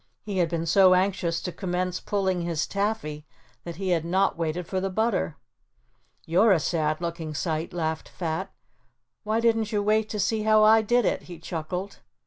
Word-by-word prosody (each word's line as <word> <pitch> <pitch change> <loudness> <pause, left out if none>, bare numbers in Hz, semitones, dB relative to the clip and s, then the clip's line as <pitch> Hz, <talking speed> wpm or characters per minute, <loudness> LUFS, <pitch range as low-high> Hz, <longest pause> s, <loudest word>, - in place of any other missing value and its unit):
He 200 -3 -3
had 170 -2 +2
been 165 0 -2
so 185 +2 +6
anxious 180 -3 0
to 180 - -3
commence 180 0 -2
pulling 190 -3 -1
his 170 -2 -1
taffy 195 -8 -3 0.4
that 170 -1 -6
he 190 +2 -3
had 170 -3 +2
not 190 +4 +1
waited 165 +1 -2
for 185 +2 -2
the 195 - -1
butter. 220 - 0 0.9
"You're 190 +7 +4
a 175 - +3
sad 155 0 -1
looking 165 -2 -4
sight," 160 +1 -2
laughed 160 -2 -3
Fat. 180 +3 -4 0.7
"Why 215 +1 0
didn't 225 -2 +1
you 205 -2 0
wait 215 +1 +2
to 210 - -4
see 215 +2 +1
how 215 0 +4
I 220 +1 +6
did 240 +1 +2
it," - - 0
he 175 - -8
chuckled. 175 +4 -5
185 Hz, 180 wpm, -26 LUFS, 165-205 Hz, 0.9 s, so